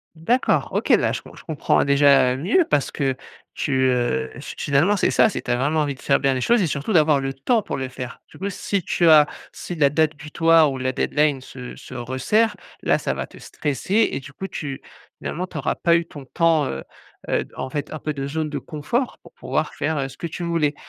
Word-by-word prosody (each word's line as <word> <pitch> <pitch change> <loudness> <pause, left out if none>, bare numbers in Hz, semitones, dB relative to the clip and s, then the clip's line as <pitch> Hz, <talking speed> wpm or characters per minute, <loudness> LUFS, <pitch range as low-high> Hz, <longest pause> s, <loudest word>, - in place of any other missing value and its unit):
D'accord, 230 +11 +1
OK, - - -1
là, - - +4
je - - -4
je - - -13
comprends, 155 -4 +1
déjà, 140 -2 +5
heu, - - -3
mieux 210 - +2
parce 145 -3 +1
que 135 -3 -1 0.4
tu, 145 - -2 0.2
heu 125 +5 0
fi - - -7
finalement, 150 +8 +2
c'est - - +2
ça, 220 - +4
c'est - - -4
tu - - -7
as 120 - +3
vraiment 145 +5 +1
envie 145 -2 -1
de 130 - -17
faire 140 - +2
bien 135 -1 +2
les 130 - -2
choses 240 - +3
et 185 - +2
surtout 145 +6 -2
d'avoir 155 -4 +5
le 135 0 -2
temps 215 - +1
pour - - -4
les 130 -1 -3
faire. 125 -1 -8
Du - - -16
coup, 195 +2 -3
si 200 0 -2
tu 170 0 +2
as 155 -2 +8 0.3
si 175 - -6
la 150 -4 +4
date 155 +2 +1
butoir 160 +1 +3
ou 135 - -4
la 130 0 -1
deadline 145 +1 +1
se 125 -1 -9
se - - -11
resserre, 130 - 0 0.3
là, - - +2
ça - - -2
va - - -4
te - - -15
stresser 180 - 0
et - - -2
du 135 +1 -13
coup, 190 - -6
tu 140 -7 -6 0.4
finalement, 180 +3 -4
tu 175 - -11
auras 140 - -1
pas 170 -1 +3
eu 170 - 0
ton 145 -4 -11
temps, 160 +1 +2
heu 65 - -4 0.5
heu, - - 0
en 130 - -4
fait, 145 +1 -4
un 155 - -5
peu 155 +1 -3
de 140 -1 -4
zone 155 +2 -2
de 145 - -3
confort 165 - -2
pour - - -16
pouvoir 485 - -2
faire, 160 - -1
heu, 135 -2 -1
ce - - -15
que - - -4
tu 170 +2 -6
voulais. 165 -4 +1
150 Hz, 240 wpm, -22 LUFS, 135-170 Hz, 0.5 s, as